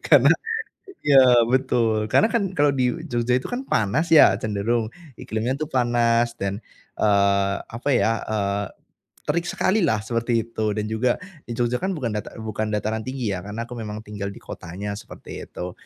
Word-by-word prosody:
karena - - +6 0.7
iya 140 -2 +7 0.3
betul. 115 -4 +1
Karena, 220 - +4
kan, 230 -3 +2
kalau 145 -1 +4
di 130 -2 +1 0.2
Jogja 120 +1 0
itu, 130 - -2
kan, 245 - -1
panas, 125 - +1
ya, 160 -11 +8
cenderung 110 +2 0 0.3
iklimnya, 110 +4 -2
tuh, 155 - -2
panas 120 -2 +2
dan, 100 +3 -3 0.3
eee, 100 -1 +3
apa 120 +5 -5
ya, 110 -2 +3
eee, 100 -1 -1 0.6
terik 170 0 0
sekalilah 175 - +1
seperti 115 0 0
itu, 115 -1 -4
dan 105 - -1
juga 110 +3 0 0.3
di 120 - -4
Jogja, 120 0 0
kan, 190 -2 -1
bukan 120 -7 -2
data 105 - -5
bukan 110 -1 -3
dataran 110 +1 -1
tinggi, 125 -3 -3
ya, 90 - -3
karena 105 +4 -5
aku 120 - -12
memang 105 0 -6
tinggal 105 -2 -5
di 100 - -9
kotanya 100 +5 -6
seperti 105 +3 -9
itu. 90 0 -6
115 Hz, 165 wpm, -23 LUFS, 105-125 Hz, 0.7 s, ya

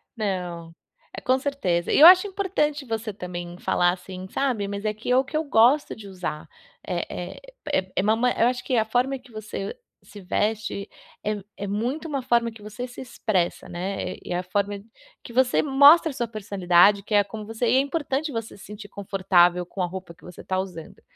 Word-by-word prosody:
Não, 180 -6 -4 0.4
é - - -6
com 255 +1 +2
certeza. 225 -12 -1
E - - +4
eu 315 - +11
acho 370 +3 +8
importante 350 -8 -1
você 225 -1 -3
também 175 -2 -7
falar 175 0 +2
assim, 185 +1 -8
sabe. 245 -6 -1
"Mas 200 +1 -5
é 215 - +1
que, 220 +3 -5
é 250 - +5
o 265 - +4
que 290 - -9
eu 315 - 0
gosto 280 +1 +3
de 210 -2 -11
usar". 180 -5 -5 0.4
É - - -4 0.4
é 185 0 0
é, - - +4
ma 225 +4 +2
eu 235 - +2
acho 250 0 -1
que 255 - -1
a 220 - +3
forma 250 +4 0
que 250 0 -19
você 215 - -6 0.3
se 205 - -12
veste 210 +1 -2 0.4
é 210 -1 -2
é 200 - -4
muito 240 +11 -2
uma 280 -4 -2
forma 235 -2 +1
que 220 -1 -15
você 215 +4 -6
se 245 - -10
expressa, 215 -8 -2
né. 185 +3 -4
É 175 - -3
a 180 - -2
forma 200 +2 -2 0.4
que 235 - -11
você 255 0 +3
mostra 290 +4 +6
a - - -9
sua 240 -2 -2
personalidade 200 -2 +3
que 210 - -6
é 205 - +6
como 215 +1 -8
você 225 +3 -2
e - - +3
é - - +6
importante 285 +1 -1
você 225 -3 -5
se 195 - -14
sentir 210 0 -9
confortável 180 -3 +2
com 185 +2 -6
a 180 - +2
roupa 180 -1 -7
que 170 - -26
você 180 - -11
está 185 - -2
usando. 180 -4 -7
215 Hz, 205 wpm, -24 LUFS, 190-255 Hz, 0.4 s, eu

